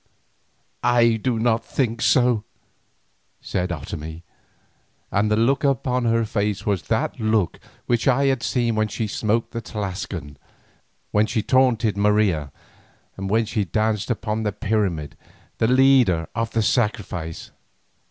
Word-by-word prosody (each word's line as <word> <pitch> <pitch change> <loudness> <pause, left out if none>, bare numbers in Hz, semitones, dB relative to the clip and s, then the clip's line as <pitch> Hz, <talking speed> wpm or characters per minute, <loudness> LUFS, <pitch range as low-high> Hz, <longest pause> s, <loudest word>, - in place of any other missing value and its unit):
"I 120 -2 +4
do 125 -1 0
not 115 0 +1
think 115 -3 -2
so," 120 -4 +3 1.0
said 90 -1 -2
Otomie, 80 +1 -6 0.9
and 105 +2 +1
the 105 - +3
look 120 +7 +2
upon 125 -2 +1
her 115 0 +2
face 105 -2 -2
was 100 -3 -1
that 110 +2 -1
look 110 -5 0 0.3
which 120 +1 0
I 135 +1 +3
had 135 -3 +1
seen 120 -2 0
when 110 0 +1
she 110 - -3
smote 110 +2 -1
the 115 - -4
Tlascalan, 95 - -5 0.7
when 105 +1 +3
she 110 -3 -1
taunted 115 -6 +2
Marina, 100 -8 +2 0.6
and 95 0 -5
when 110 +2 +2
she 105 -1 -1
danced 110 +4 -1
upon 110 -2 -2
the 105 -1 -1
pyramid, 100 -8 -1 0.4
the 110 - +3
leader 125 - +4
of 115 0 -1
the 115 - +1
sacrifice. 95 -8 -2
110 Hz, 135 wpm, -23 LUFS, 100-120 Hz, 1.0 s, I